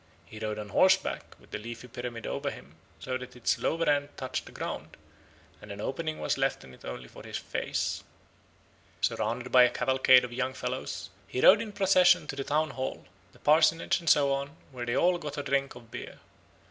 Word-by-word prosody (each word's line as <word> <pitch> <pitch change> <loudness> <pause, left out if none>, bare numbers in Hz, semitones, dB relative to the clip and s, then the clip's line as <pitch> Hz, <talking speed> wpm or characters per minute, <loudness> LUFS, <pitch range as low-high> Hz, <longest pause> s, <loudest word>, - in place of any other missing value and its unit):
He 110 - -11
rode 110 -1 -3
on 105 -1 -6
horseback 190 - +3 0.2
with - - -21
the - - -4
leafy 120 +3 -8
pyramid 120 -1 -6
over - - -2
him, - - -11 0.3
so 130 0 -3
that 125 0 -10
its 125 - 0
lower 165 0 0
end 145 -1 +2
touched 130 -1 -4
the - - -11
ground, - - -6 0.6
and 105 - -10
an 100 - -7
opening 155 +7 -3
was - - -1
left 135 0 0
in 65 - -13
it - - -17
only 60 0 -7
for - - -13
his - - -5
face. - - -2 1.0
Surrounded 125 +2 -1
by 130 - +8
a 125 - +7
cavalcade 130 0 +4
of 120 - -9
young 130 +1 -2
fellows, 125 -6 -4 0.2
he 125 - -4
rode 205 - +7
in 220 -2 -5
procession 190 -5 +4
to 145 - -5
the 140 - -3
town 150 +2 0
hall, 130 0 -4 0.3
the - - -20
parsonage, 155 +2 +3
and 170 -2 -1
so 140 -2 +5
on, 140 +3 -4
where 120 -2 -6
they 120 - 0
all 175 0 +3
got 150 -2 -6
a 145 - -2
drink 140 -2 0
of 120 -2 -14
beer. - - -8
130 Hz, 205 wpm, -29 LUFS, 120-150 Hz, 1.0 s, by